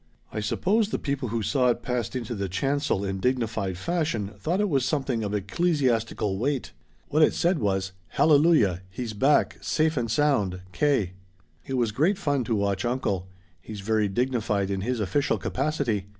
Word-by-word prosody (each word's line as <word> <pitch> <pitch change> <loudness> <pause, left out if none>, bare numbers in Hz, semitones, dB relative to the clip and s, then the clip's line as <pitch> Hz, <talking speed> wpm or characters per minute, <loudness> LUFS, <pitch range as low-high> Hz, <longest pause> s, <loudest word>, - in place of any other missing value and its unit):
I - - -2
suppose 200 - +1
the - - -1
people 140 -4 -2
who 115 0 -1
saw 130 +2 +2
it 120 -1 +1
passed 125 -1 -2
into 120 -2 -3
the 100 -3 -3
chancel 135 - 0
in 95 0 -3
dignified 110 -5 -1
fashion 120 - -1
thought 155 - -2
it 210 - +2
was 140 -8 +1
something 135 -5 -1
of 105 0 -2
ecclesiastical 115 - 0
weight. 135 +2 -1 0.4
What 155 - +2
it 155 - +5
said 175 -1 +2
was, 95 -2 0 0.2
'Hallelujah 145 - +4
he's 110 +3 -5
back 135 +8 +2
safe 155 -1 +1
and 115 -2 -1
sound. 105 -10 +1
K 110 -3 +1 0.3
.' 95 - -36
"It 135 - -2
was 120 -4 +1
great 160 - +2
fun 145 -8 0
to 115 - 0
watch 100 0 0
uncle 120 -7 -1 0.3
he's 105 +1 -8
very 110 +1 +1
dignified 105 -3 0
in 95 -1 -1
his 120 +3 -1
official 135 +8 +1
capacity. 130 -8 -1
120 Hz, 175 wpm, -26 LUFS, 100-145 Hz, 0.4 s, it